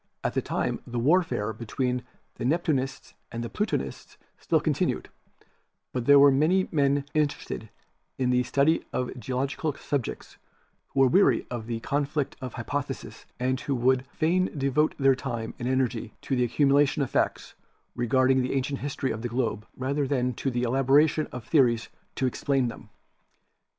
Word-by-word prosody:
At - - -1
that - - -1
time - - -1
the 120 - -4
warfare 130 - +2
between 125 +3 -2 0.3
the - - -7
Neptunists 135 -2 -1 0.2
and 115 0 -4
Plutonists 135 - -3 0.2
still - - +2
continued, - - -1 0.8
but 125 -2 -3
there 145 0 +8
were 140 0 +8
many 165 +8 +3
men 140 -2 +2
interested 145 - -2 0.5
in 125 -1 +1
the 125 0 +3
study 140 +6 +2
of 125 0 -2
geological 135 +6 -2
subjects 140 -5 -4 0.5
who 135 - +1
were 135 - +7
weary 135 - +4
of 115 -3 -5
the 115 -1 -3
con 145 +3 0
flict 145 -1 -2
of 130 -1 -6
hypotheses 130 +4 -5
and 130 +1 0
who 140 - -1
would 130 +1 +2
fain 180 +6 +1
devote 140 +3 +1
their 135 -1 +5
time 120 -4 -4
and 120 - -3
energy 125 -3 -1
to 135 - -1
the 125 -1 +2
accumulation 140 +3 +3
of 130 - -5
facts - - -1 0.4
regarding 130 +2 +3
the 125 - -1
ancient 135 +1 -1
history 140 -1 -2
of 110 - -4
the 120 - -3
globe 115 -3 -2
rather 140 +2 -1
than 125 -2 0
to 135 - -2
the 120 -1 -1
elaboration 135 +5 +3
of 125 -2 -7
theories 120 -7 +3 0.3
to 130 - 0
explain 130 0 0
them. - - -11
130 Hz, 160 wpm, -27 LUFS, 125-145 Hz, 0.8 s, there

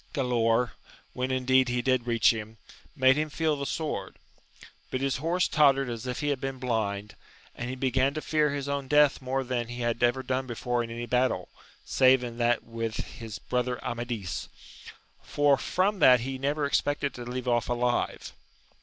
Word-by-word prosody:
Gkdaor, 120 -3 +1 0.4
when 130 +1 -2
indeed 130 0 +3
he 120 0 -1
did 130 -2 +1
reach 115 -1 +4
him, 110 0 -7 0.4
made 130 +1 +4
him 155 0 0
feel 155 0 0
the 140 -1 -4
sword, 160 -2 -3 0.7
but 130 - -2
his 135 0 0
horse 170 +6 +1
tottered 135 -4 +3
as 115 +2 -6
if 125 - -3
he 145 - 0
had 140 -2 -1
been 135 -1 -3
blind, 105 -5 -2 0.4
and 120 - -5
he 130 - -4
began 130 +2 +1
to 155 - -2
fear 150 -1 +1
his 140 -1 -3
own 140 -1 -2
death 150 0 +4
more 135 +1 -1
than 120 -2 -2
he 120 +1 -6
had 120 -1 -1
ever 120 +2 +2
done 130 +1 -2
before 120 0 -1
in 115 - -7
any 120 +1 -5
battle, 125 +1 0 0.4
save 130 -1 +4
in 120 -1 -6
that 120 0 +2
with 115 -1 -5
las 110 -2 -6
brother 125 0 -2
Amadis, 120 -6 -4 0.7
for 145 -1 +3
from 190 +9 0
that 125 -5 +7
he 130 +2 -4
never 145 +2 0
expected 145 0 0
to 120 - -7
leave 125 +1 -5
off 120 -2 +1
alive. 120 0 -1
130 Hz, 180 wpm, -28 LUFS, 120-140 Hz, 0.7 s, that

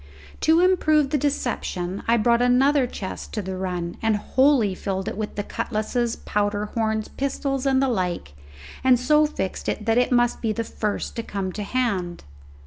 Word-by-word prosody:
To 320 +2 +4
improve 310 -6 +3
the 300 - +2
deception 205 -9 -2
I 235 +1 +4
brought 235 +2 +3
another 260 +2 +4
chest 190 -5 -7
to 215 - -2
the 190 0 -4
run, 180 -2 -3
and 225 -1 +2
wholly 260 -1 +3
filled 190 0 -3
it - - -3
with 215 0 -4
cutlasses, 230 +1 -1
powder 205 0 -1
horns, 220 -1 0
pistols, 275 0 -2
and 265 0 +3
the - - +2
like, 180 - -2 0.5
and 255 -2 +5
so 300 +4 +4
fixed 190 -10 -4
it 210 - -3
that 225 +1 +3
it 250 - +1
must 240 -1 +2
be 220 -2 0
the 230 - -2
first 210 -1 -3
to - - 0
come 195 -4 -4
to 210 - -6
hand. 200 -7 -2
230 Hz, 175 wpm, -24 LUFS, 200-260 Hz, 0.5 s, and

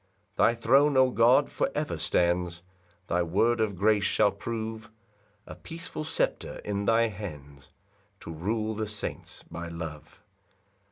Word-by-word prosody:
4 - - +5
Thy 115 - +2
throne, 135 +5 +4
O 130 -1 +5
God, 120 +2 +5
for - - 0
ever - - -1
stands; 85 0 0 0.4
Thy 90 0 0
word 110 +7 +2
of 105 -3 0
grace 105 +2 +3
shall 105 +1 +3
prove 110 +2 -5 0.6
A - - -9
peaceful 165 -1 -7
sceptre 160 - -1
in 100 -1 -2
thy 115 +1 +3
hands, 75 -9 -9 0.5
To 85 - -7
rule 110 +7 -2
the 110 0 -3
saints 105 -1 -6
by 85 0 -7
love. 80 +2 -8
105 Hz, 145 wpm, -28 LUFS, 85-115 Hz, 0.6 s, 4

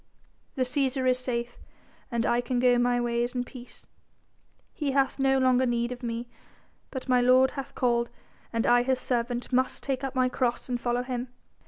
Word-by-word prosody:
"The 260 - +1
Cæsar 260 0 0
is 255 0 +3
safe, 240 -1 -3 0.5
and 235 -2 -1
I 240 +1 +2
can 245 +1 -2
go 245 0 +4
my 245 0 +2
ways 240 +1 -1
in 245 - 0
peace. 250 0 -12 0.9
He 285 -3 -2
hath 270 0 +1
no 270 0 +3
longer 255 -1 +3
need 240 0 0
of 250 0 -6
me 235 0 -4 0.6
but 260 -1 -6
my 250 -1 +4
Lord 255 +1 +5
hath 275 0 -7
called 235 -2 +1 0.4
and 230 -1 0
I 245 0 +5
His 255 +1 0
servant 245 0 -2
must 255 +1 +1
take 270 -1 -2
up 270 0 -3
my 255 -1 +3
cross 250 -1 -1
and 245 -2 -2
follow 245 0 0
Him. 250 0 -4
250 Hz, 185 wpm, -27 LUFS, 240-260 Hz, 0.9 s, Lord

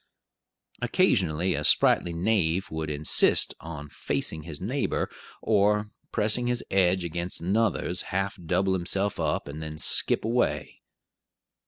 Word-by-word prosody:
Occasionally 90 +1 +1
a - - -3
sprightly 85 - +4
knave 90 0 0
would 80 -1 -4
insist 75 0 +3
on 80 -3 -8
facing 80 +2 -3
his 75 -1 -9
neighbor; 125 +9 -2 0.3
or, 105 0 +2 0.2
pressing 110 +3 0
his 125 0 -1
edge 95 -1 +2
against 85 +2 -4
another's, 95 -1 0
half 95 +2 -2
double 95 +3 +1
himself 95 +2 -1
up, - - -1
and 75 +2 -7
then 75 0 -7
skip - - +3
away. 120 +2 -1
90 Hz, 125 wpm, -26 LUFS, 80-105 Hz, 0.3 s, sprightly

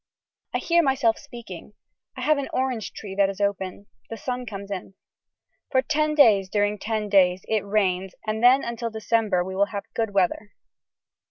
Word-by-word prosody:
I - - +4
hear 340 0 +3
myself 265 -6 +2
speaking. 235 - -10 0.4
I - - -5
have 305 -2 +2
an 275 - -4
orange 255 -4 -1
tree 200 -3 -8
that 195 0 +3
is 195 - -6
open. 200 -1 -2 0.2
The 225 - -6
sun 250 0 -4
comes 200 -2 -7
in. 190 0 -6 0.7
For 260 -1 +2
ten 305 0 0
days 210 -10 +5
during 205 0 0
ten 215 0 -2
days 185 -2 +3
it 215 -2 0
rains 195 -2 0
and 215 0 -2
then 255 +3 +6
until 235 0 -3
December 220 -4 0
we 190 +1 -6
will 200 +1 +3
have 205 -2 -5
good 225 -2 -1
weather. 200 +2 0
215 Hz, 175 wpm, -24 LUFS, 195-245 Hz, 0.7 s, then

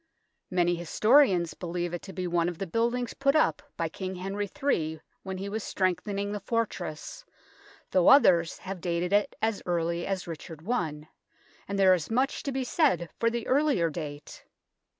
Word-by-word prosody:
Many 175 -1 +2
historians 185 - +3
believe 175 0 -4
it 175 - -3
to 195 - -9
be 185 -1 -4
one 175 -1 +1
of 175 - -7
the 195 - -3
buildings 235 +5 -1
put 275 +1 +1
up 310 - +3 0.2
by - - 0
King 190 -1 -5
Henry 195 +2 -3
III 165 - -1 0.2
when 190 -1 -5
he 195 +2 -4
was 210 +1 -3
strengthening 200 +2 -1
the 205 - -3
fortress, 200 - -3 0.7
though 185 -2 +3
others 175 - +6
have 190 -2 -7
dated 175 +2 -1
it 205 0 +2
as 220 -2 0
early 170 0 -1
as 195 -2 -2
Richard 165 -1 -8
I, 155 -10 -2 0.6
and 200 - -3
there 190 -1 +6
is 175 -4 -1
much 260 +5 0
to 280 - -3
be 265 0 -1
said 245 - +1
for 230 - +3
the 235 -1 -3
earlier 265 - +2
date. 145 -2 -7
190 Hz, 170 wpm, -28 LUFS, 170-230 Hz, 0.7 s, others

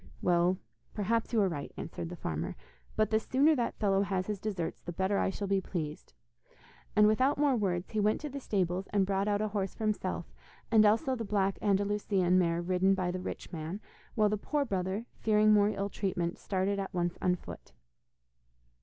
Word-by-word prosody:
'Well, 175 +1 +2 0.4
perhaps 225 +2 0
you 230 - +2
are 195 - +3
right,' 150 -6 -4
answered 165 - -5
the 180 - -6
farmer, 80 - -4 0.4
'but 215 0 +1
the 220 - +4
sooner 280 +7 +3
that 240 -3 -1
fellow 195 -2 +2
has 190 -2 -1
his 210 -1 -3
deserts, 190 -5 -3
the 175 - -6
better 190 +3 0
I - - +1
shall 200 +1 -4
be 195 0 +2
pleased,' 155 - -5 0.8
and 210 - +6
without 255 +7 +3
more 285 -2 +3
words 185 -5 -1
he 215 - -1
went 210 +1 +2
to 300 - -4
the 280 +1 -5
stables 190 -5 -1
and 200 -2 +2
brought 195 +1 0
out 205 0 +1
a 215 - -1
horse 195 -2 -2
for - - -6
himself 190 -5 -1 0.5
and 215 -2 +7
also 230 +5 +2
the 230 - -4
black 195 -2 0
Andalusian 200 -2 +2
mare 170 -1 +1
ridden 185 +2 +2
by 180 -2 -1
the 185 - -3
rich 185 - -6
man, 165 +4 -4 0.4
while 215 -2 +4
the 215 - 0
poor 290 +7 -1
brother, 190 +1 -2
fearing 215 0 +4
more 205 0 +5
ill 200 -1 -2
treatment, 180 -3 -2
started 195 +1 -1
at 195 -1 -5
once 175 -1 0
on 180 -1 +3
foot. - - -11
195 Hz, 200 wpm, -31 LUFS, 180-215 Hz, 0.8 s, and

